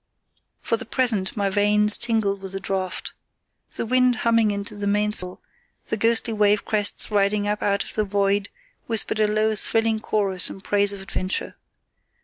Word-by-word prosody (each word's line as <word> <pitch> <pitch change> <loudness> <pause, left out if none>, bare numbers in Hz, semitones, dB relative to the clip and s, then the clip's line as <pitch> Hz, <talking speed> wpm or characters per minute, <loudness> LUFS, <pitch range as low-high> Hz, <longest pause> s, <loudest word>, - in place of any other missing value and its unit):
For 230 - 0
the - - -2
present 220 -5 0
my 200 -1 0
veins 210 +1 +3
tingled 210 -4 0
with 190 -1 -7
the 195 - -3
draught. 190 -1 -4 0.6
The - - -3
wind 250 +1 +3
humming 230 -2 +3
into 200 0 -4
the 205 0 -4
mainsail, 205 -3 0 0.4
the - - -2
ghostly 225 +1 +1
wave 210 -1 +2
crests 210 0 0
riding 205 0 +1
up 210 0 -2
out 200 0 +1
of - - -8
the 215 - 0
void, 200 0 0 0.4
whispered 225 -1 +1
a 215 - +3
low 215 +1 +1
thrilling 225 +1 +1
chorus 195 -4 +1
in - - -9
praise 205 0 +2
of 200 -1 -7
adventure. 185 -1 -4
205 Hz, 165 wpm, -23 LUFS, 200-220 Hz, 0.6 s, veins